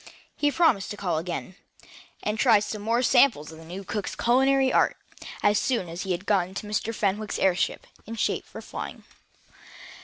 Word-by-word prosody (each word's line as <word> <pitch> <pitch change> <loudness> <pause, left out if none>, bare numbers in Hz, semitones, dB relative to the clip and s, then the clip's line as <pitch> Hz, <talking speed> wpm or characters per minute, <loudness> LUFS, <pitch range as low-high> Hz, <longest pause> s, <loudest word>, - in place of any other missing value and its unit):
He 290 - +2
promised 290 - +2
to 205 - -6
call 175 -6 -1
again, 180 +2 -5 0.7
and 210 +1 -2
try 230 -4 +6
some 210 0 -5
more 230 +4 +1
samples 245 - +4
of 160 - -12
the - - -12
new 180 +4 -7
cook's 205 +1 -4
culinary 265 +2 +3
art, - - +3 0.5
as 205 0 +4
soon 240 -9 0
as 170 +3 -6
he 190 - -3
had 180 +2 -2
gotten 190 -2 +1
Mr. 210 +2 -2
Fenwick's 210 -1 -1
airship 185 -1 +1 0.2
in 230 - -5
shape - - -1
for - - -10
flying. - - -7
210 Hz, 175 wpm, -26 LUFS, 185-235 Hz, 0.7 s, try